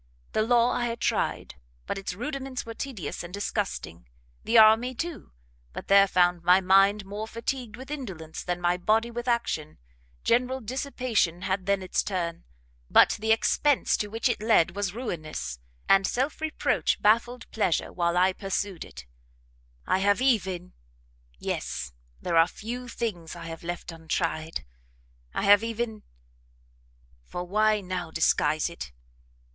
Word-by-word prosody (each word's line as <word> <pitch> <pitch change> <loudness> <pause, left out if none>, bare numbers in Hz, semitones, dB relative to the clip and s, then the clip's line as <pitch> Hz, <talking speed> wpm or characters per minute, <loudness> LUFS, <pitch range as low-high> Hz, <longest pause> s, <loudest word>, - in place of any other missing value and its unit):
The - - +1
law 240 +2 +3
I 245 -1 0
had 230 0 -4
tried, 65 - -1 0.3
but - - -3
its 195 -2 -5
rudiments 265 +2 -4
were 230 - -6
tedious 225 - -5
and 175 - -8
disgusting; 195 - -4 0.4
the 230 - +3
army, 225 +4 +6
too, 335 +5 -5 0.4
but - - -8
there 200 0 +7
found 175 -2 +3
my 180 +2 +6
mind 195 +2 +4
more 205 +3 -5
fatigued 230 0 -4
with 265 +3 -10
indolence, 190 - -6
than 175 -1 -3
my 175 0 +1
body 220 +6 +1
with 240 +1 -5
action; 235 -11 -1 0.5
general 250 +2 +2
dissipation 245 - -1
had 190 0 -2
then 200 -1 +1
its 185 - 0
turn, 170 -3 -3 0.4
but - - +6
the 220 +1 +1
expence 275 +5 +3
to 210 - -2
which 225 +4 -1
it 240 -3 -1
led 215 -6 +3
was 200 -2 -1
ruinous, 155 - -5 0.3
and 195 0 +5
self 265 +5 -1
reproach 315 -1 0
baffled 235 +3 +2
pleasure 190 -6 0
while 170 0 0
I 185 +1 +4
pursued 195 -2 -3
it; 65 - -11 0.8
I - - +2
have 200 +2 +3
even 190 -9 0 0.6
yes, 65 +1 -4 0.3
there 170 -2 0
are 165 +1 +6
few 245 +6 -6
things 200 -9 -4
I - - -8
have 165 -1 -7
left 175 0 -5
untried, 160 0 -3 0.7
I - - -1
have 205 +2 +6
even, 230 -1 -3 1.2
for 175 - -5
why 215 +3 +2
now 180 -2 -4
disguise 155 -1 +2
it? 170 - -8
200 Hz, 150 wpm, -27 LUFS, 175-235 Hz, 1.2 s, there